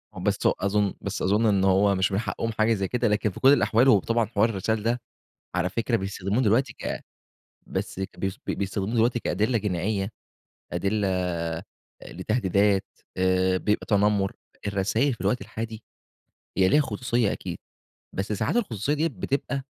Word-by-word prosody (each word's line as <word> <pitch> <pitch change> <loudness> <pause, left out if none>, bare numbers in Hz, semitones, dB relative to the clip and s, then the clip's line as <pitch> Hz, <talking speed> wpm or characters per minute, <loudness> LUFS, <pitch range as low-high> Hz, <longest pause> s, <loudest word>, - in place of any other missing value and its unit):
بس - - -1
هو - - +5
أظن 100 0 +1
بس - - -4
أظن 105 +4 +2
إن 100 -3 +3
هو 95 +1 +4
مش 95 +1 +1
من 95 - +1
حقهم 110 +2 -2
حاجة 110 +1 +2
زي 95 -2 -1
كده، 125 -1 0
لكن 105 0 +1
في - - -10
كل 135 +2 +7
الأحوال 125 -2 +3
هو 105 -7 +7
طبعًا 115 +3 +1
حوار 110 +1 +2
الرسايل 110 +1 -1
ده 120 +1 0 0.5
على 90 0 +1
فكرة 115 +4 0
بيستخدموه 100 +3 -1
دلوقتي 115 +2 +2
ك - - -4 0.7
بس - - -4
بي 95 0 -3 0.2
بيستخدموه 100 +3 -2
دلوقتي 120 +1 +3
كأدلة 110 +4 +1
جنائية، 100 0 -1 0.6
أدلة 90 -5 -1 0.5
لتهديدات، 100 -3 +1 0.3
آآ 95 0 +2
بيبقى 105 +3 0
تنمّر. 100 -1 +2 0.4
الرسايل 110 +7 +1
في 115 - -9
الوقت 105 +6 +1
الحالي 110 +2 -6 0.8
هي 95 -1 +4
ليها 150 - +5
خصوصيّة 120 -3 0
أكيد. 90 -3 -5 0.5
بس 100 +2 -3
ساعات 105 - 0
الخصوصيّة 140 - 0
دي 160 +2 +1
بتبقى 140 -5 -2
105 Hz, 155 wpm, -26 LUFS, 95-115 Hz, 0.8 s, كل